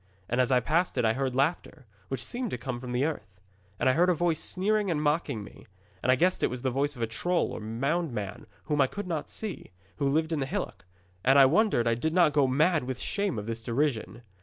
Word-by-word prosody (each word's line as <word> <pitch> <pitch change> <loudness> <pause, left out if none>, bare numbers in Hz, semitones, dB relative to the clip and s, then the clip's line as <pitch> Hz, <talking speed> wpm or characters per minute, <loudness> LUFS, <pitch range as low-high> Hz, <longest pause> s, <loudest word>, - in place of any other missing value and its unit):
And 120 +2 +1
as 125 - +1
I 125 - +5
passed 165 +7 0
it 120 - +2
I 110 - +3
heard 130 0 -2
laughter, 145 0 -1 0.2
which 130 -2 -4
seemed 245 - -3
to - - -3
come 130 -3 -5
from 125 0 -7
the 125 +3 +1
earth. 105 - -5 0.4
And - - +1
I 130 - +5
heard 175 +6 +3
a 180 - +3
voice 165 -1 +1
sneering 205 +2 0
and 160 -4 0
mocking 150 -7 0
me. 100 - -14 0.3
And 130 - +3
I - - +5
guessed 180 +7 +2
it - - +2
was 125 0 -6
the 130 - +1
voice 140 +3 0
of 120 - -4
a - - +3
troll 175 +11 -1
or - - -5
moundman 115 - -3 0.2
whom 150 -1 +1
I 135 - +4
could 205 +9 -6
not 165 -5 -3
see, 215 -4 -6 0.3
who 140 - 0
lived 160 +3 +1
in 160 - 0
the 135 - -1
hillock, 135 - -4 0.4
and 135 +2 +5
I 135 - +9
wonder 170 - +3
I 115 - +3
did 160 +8 -1
not 170 -5 +5
go 145 -2 +4
mad 150 +3 +2
with 130 -1 -3
the - - -5
shame 200 - -1
of 105 - -4
his 115 0 -4
derision. 120 -1 -1
140 Hz, 250 wpm, -28 LUFS, 125-170 Hz, 0.4 s, I